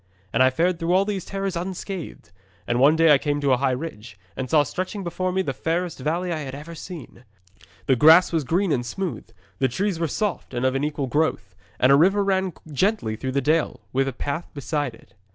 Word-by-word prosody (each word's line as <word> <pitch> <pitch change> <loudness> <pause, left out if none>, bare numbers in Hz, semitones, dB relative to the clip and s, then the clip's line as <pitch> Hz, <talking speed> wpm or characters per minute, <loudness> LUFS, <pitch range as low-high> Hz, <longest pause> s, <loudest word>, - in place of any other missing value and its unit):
'And - - +2
I 130 - +7
fared 170 +6 0
through 170 +1 0
all 190 +2 +4
these 200 -3 -3
terrors 195 -2 -3
unscathed, 185 0 -6 0.3
and 120 0 0
one 145 +4 +6
day 165 -1 +6
I 140 - +5
came 145 0 -1
to 140 -1 +1
a 130 - +4
high 135 +1 +1
ridge, 125 - -5 0.2
and 130 -1 -4
saw 155 -2 +5
stretching 185 +7 -4
below 185 +1 -2
me 190 +1 0
the 135 - -2
fairest 165 +3 -2
valley 170 +6 -1
I 160 - -3
had 135 -3 -6
ever 150 +4 -9
seen. 165 -7 -10 0.6
The 130 - +3
grass 160 +7 +7
was 160 -2 +1
green 175 +6 +1
and 125 -4 +1
smooth, 180 +9 -4 0.3
the 130 - +3
trees 185 - -1
were 165 - 0
soft 195 -6 -3
and 120 +1 -1
of 130 - +2
an 135 +1 -1
equal 150 -2 -1
growth; 140 - -1 0.3
and 130 - +5
a - - +8
river 195 +7 +4
ran 190 -2 0 0.2
gently 150 - 0
through 130 +3 -4
the 140 - +1
dale, 155 +3 +1
with 135 +1 +1
a - - -1
path 145 +7 -4
beside 145 -3 -2
it. - - -21
155 Hz, 225 wpm, -24 LUFS, 135-180 Hz, 0.6 s, a